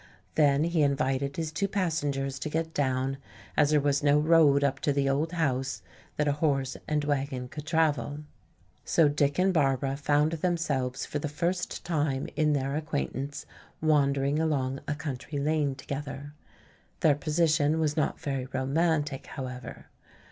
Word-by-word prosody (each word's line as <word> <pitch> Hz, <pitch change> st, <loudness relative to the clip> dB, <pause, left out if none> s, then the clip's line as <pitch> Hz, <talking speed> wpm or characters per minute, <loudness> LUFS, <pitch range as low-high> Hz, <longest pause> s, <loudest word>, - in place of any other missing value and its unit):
Then 145 Hz, -1 st, +4 dB
he 170 Hz, -1 st, +1 dB
invited 140 Hz, -1 st, 0 dB
his 160 Hz, -2 st, -2 dB
two 200 Hz, +5 st, -1 dB
passengers 145 Hz, -8 st, -1 dB
to 140 Hz, -, -3 dB
get 160 Hz, +1 st, -2 dB
down, 135 Hz, -1 st, 0 dB, 0.4 s
as 150 Hz, -2 st, +4 dB
there 150 Hz, -1 st, +4 dB
was 145 Hz, 0 st, +1 dB
no 145 Hz, 0 st, +4 dB
road 150 Hz, -2 st, +5 dB
up 140 Hz, -1 st, +1 dB
to 145 Hz, -, +1 dB
the 140 Hz, -1 st, +1 dB
old 150 Hz, +5 st, 0 dB
house 135 Hz, -, -1 dB, 0.3 s
that 150 Hz, -, +1 dB
a -, -, +4 dB
horse 135 Hz, -4 st, +1 dB
and 150 Hz, -1 st, 0 dB
wagon 135 Hz, -3 st, -2 dB
could 150 Hz, +3 st, -9 dB
travel. 150 Hz, -4 st, +1 dB, 0.6 s
So 160 Hz, -, +4 dB
Dick 145 Hz, -1 st, +1 dB
and 185 Hz, +1 st, +3 dB
Barbara 135 Hz, -3 st, +1 dB
found 145 Hz, +2 st, +2 dB
themselves 150 Hz, -7 st, -1 dB
for 145 Hz, -, -3 dB
the 150 Hz, -, -3 dB
first 175 Hz, +4 st, -2 dB
time 145 Hz, -5 st, 0 dB
in 150 Hz, 0 st, +2 dB
their 140 Hz, 0 st, -1 dB
acquaintance 145 Hz, -2 st, -3 dB, 0.3 s
wandering 140 Hz, -2 st, +2 dB
along 135 Hz, -4 st, 0 dB
a 150 Hz, -, -1 dB
country 145 Hz, 0 st, -5 dB
lane 145 Hz, -1 st, +1 dB
together. 140 Hz, +1 st, -6 dB, 0.7 s
Their 155 Hz, -, +5 dB
position 155 Hz, 0 st, +2 dB
was 150 Hz, -2 st, +1 dB
not 155 Hz, -, 0 dB
very 135 Hz, -3 st, -3 dB
romantic, 145 Hz, +2 st, 0 dB
however. 125 Hz, -2 st, -7 dB
145 Hz, 155 wpm, -28 LUFS, 135-155 Hz, 0.7 s, road